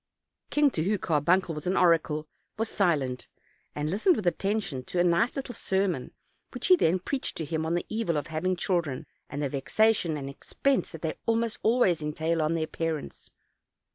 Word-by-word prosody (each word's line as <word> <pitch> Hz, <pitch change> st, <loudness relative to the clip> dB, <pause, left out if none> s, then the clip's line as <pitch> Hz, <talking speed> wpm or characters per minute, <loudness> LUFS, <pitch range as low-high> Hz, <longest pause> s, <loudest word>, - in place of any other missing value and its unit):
The -, -, -9 dB
king, 295 Hz, -1 st, +5 dB
to 160 Hz, -, -1 dB
whom 205 Hz, +4 st, +1 dB
Carbuncle 170 Hz, +2 st, +2 dB
was 150 Hz, +2 st, -6 dB
an 185 Hz, -, +1 dB
oracle, 160 Hz, -3 st, +3 dB, 0.3 s
was 225 Hz, +1 st, -1 dB
silent, 145 Hz, -10 st, 0 dB, 0.5 s
and 150 Hz, 0 st, -2 dB
listened 215 Hz, -, +3 dB
with 210 Hz, -, -4 dB
attention 195 Hz, -7 st, -1 dB
to 180 Hz, -, -2 dB
a -, -, +5 dB
nice 180 Hz, +7 st, +2 dB
little 270 Hz, -2 st, -4 dB
sermon 190 Hz, -, -1 dB, 0.4 s
which -, -, -4 dB
he 365 Hz, -, +9 dB
then 185 Hz, -, +2 dB
preached 260 Hz, +9 st, -3 dB
to 160 Hz, -, -3 dB
him 160 Hz, +1 st, -2 dB
on 165 Hz, -, 0 dB
the 175 Hz, -, -1 dB
evil 215 Hz, -8 st, -1 dB
of 145 Hz, -, -2 dB
having 165 Hz, +4 st, -1 dB
chil 175 Hz, 0 st, +1 dB
dren, 140 Hz, -5 st, -6 dB, 0.2 s
and 145 Hz, +1 st, -3 dB
the 140 Hz, -, 0 dB
vexation 170 Hz, +4 st, +2 dB
and 135 Hz, -1 st, -5 dB
expense 265 Hz, -, -1 dB
that 165 Hz, -, -9 dB
they 160 Hz, -, -3 dB
almost 230 Hz, 0 st, 0 dB
always 220 Hz, -8 st, +3 dB
entail 160 Hz, +2 st, -1 dB
on 155 Hz, +2 st, +1 dB
their 160 Hz, -1 st, 0 dB
parents. 160 Hz, -1 st, -4 dB
170 Hz, 195 wpm, -28 LUFS, 155-205 Hz, 0.5 s, he